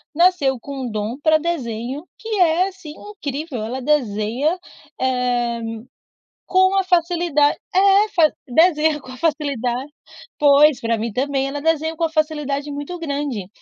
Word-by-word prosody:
nasceu 335 -6 +3
com 265 -1 -6
dom 215 +3 -3
para 315 0 +4
desenho, 275 -2 -4
que 450 - -9
é 355 +1 +3
assim 360 -6 -11
incrível, 300 - -6
ela 250 +4 -4
desenha, 255 - 0 0.4
eh, 245 -2 0 0.9
com 375 +1 +3
a 385 - +3
facilidade 340 -4 +2 0.2
é 395 +3 +4
fa 325 -6 +3 0.2
desenha 310 +2 +3
com 255 - -12
a 255 - -10
facilidade, 280 -4 -1 0.5
pois, 290 0 +5
para 230 0 0
mim 225 +1 -3
também, 270 +1 0
ela 285 +1 -4
desenha 320 +1 0 0.8
muito 290 +5 -6
grande. 280 - -3
290 Hz, 130 wpm, -20 LUFS, 255-335 Hz, 0.9 s, pois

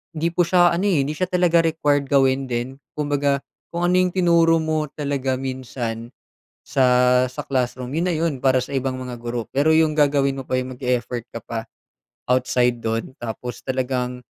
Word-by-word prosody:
hindi 160 +2 0
po 180 - +2
siya 175 -1 +4
ano, 180 +4 0
eh, 165 -7 +3
hindi 150 - -2
siya 185 +2 -1
talaga 175 -2 +3
required 145 -3 +1
gawin 135 -1 +3
din. 120 +3 -3 0.2
Kumbaga 145 -1 0 0.3
kung 170 +1 0
ano 180 - +3
'yung 180 -1 +1
tinuro 170 -2 +4
mo 155 -1 -1
talaga 140 -3 -2
minsan 120 -3 -5 0.5
sa 125 -1 +3
sa 130 - -7
classroom, 125 -1 -2
yon 170 +3 0
na 175 - 0
yon 160 -1 0
para 130 -1 +4
sa 135 - -10
ibang 130 -1 -1
mga 125 -2 -7
guro. 120 0 -3
Pero 145 +4 +3
'yung 160 -1 +4
gagawin 140 -2 +2
mo 135 - -5
pa 130 - 0
'yung 130 0 -5
mag-e-effort 125 -2 -2
ka 115 - -6
pa 115 -1 -5 0.7
outside 125 -1 +2
do'n 115 +2 -2
tapos 120 +1 -6
talagang, 125 -1 -2
135 Hz, 180 wpm, -22 LUFS, 125-155 Hz, 0.7 s, siya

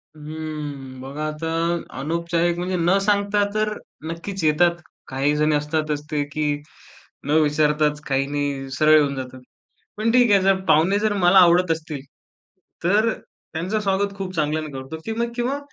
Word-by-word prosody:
हं, 150 -4 -7
बघा 140 +4 -5
आता 155 +2 -4 0.5
अनौपचारिक, 170 +3 0
म्हणजे 180 +1 -2
न 175 +3 +3
सांगता 205 0 +2
तर 215 0 +1 0.4
नक्कीच 180 +3 -5
येतात. 170 +3 +3 0.3
काहीजण 150 +3 +1
असतातच 150 0 -1
ते, 150 -1 +1
की 150 0 -1 0.7
न - - -1
विचारताच, 150 0 +2
काही 135 0 +1
नाही 140 -2 -3
सरळ 155 0 +6
होऊन 140 -1 0
जातात. 130 -1 -7 0.6
पण 220 +2 +1
ठीक 245 -2 +4
आहे 200 -1 +5
जर 195 0 +3
पाहुणे 175 +7 +4
जर 215 0 +1
मला 180 +2 +7
आवडत 175 -1 +5
असतील 155 -3 -4 0.8
तर 210 +6 +3 0.4
त्यांचं 180 +7 -1
स्वागत 200 0 0
खूप 185 -2 -5
चांगल्याने 155 0 -1
करतो, 135 +4 -6
की - - -3
मग 235 0 -1
किंवा 245 +3 -1
160 Hz, 150 wpm, -22 LUFS, 150-190 Hz, 0.8 s, मला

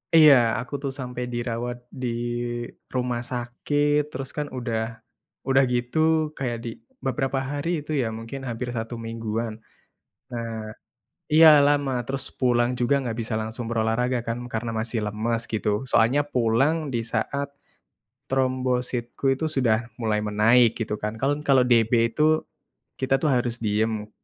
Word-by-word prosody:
Iya, 155 -3 +9 0.3
aku 125 +4 -7
tuh 135 - -1
sampai 125 -1 -4
dirawat 120 0 -3 0.2
di 125 - -1 0.9
rumah 125 -1 -1
sakit. 145 +5 0
Terus 135 +1 -5
kan 150 -1 -1
udah 115 -2 -1 0.7
udah 135 0 +5
gitu 120 +5 -1 0.4
kayak 120 -3 -2
di 120 - -3 0.4
beberapa 135 +1 0
hari 145 +3 -2
itu 150 +1 -7
ya 115 - 0
mungkin 115 +4 -7
hampir 120 +2 -4
1 115 +2 -4
mingguan. 115 0 -3 0.8
Nah 115 -1 -4 0.8
iya, 160 +1 +9 0.2
lama. 145 -2 +2
Terus 135 0 -3 0.2
pulang 120 -1 +3
juga 125 +3 +3
nggak 115 -3 -3
bisa 110 0 -4
langsung 110 +2 -5
berolahraga 115 +2 +1
kan 115 +1 -1 0.2
karena 115 +1 -2
masih 115 0 -2
lemas 110 +2 -1
gitu, 105 -1 0 0.2
soalnya 125 +6 +4
pulang 125 +6 +3 0.2
di 120 - +1
saat 140 +5 -1 0.8
trombositku 130 -1 -1
itu 160 - -4
sudah 115 -4 +4 0.2
mulai 110 -2 +1
menaik 115 +3 +4
gitu 105 -1 -1
kan. 105 0 -1
Kan 145 +2 +1
kalau 130 -2 +6
DB 115 -1 +4 0.2
itu 155 +1 +3 0.6
kita 135 0 0
tuh 155 - +2
harus 120 -1 0
diem 105 0 0
120 Hz, 140 wpm, -25 LUFS, 115-135 Hz, 0.9 s, Iya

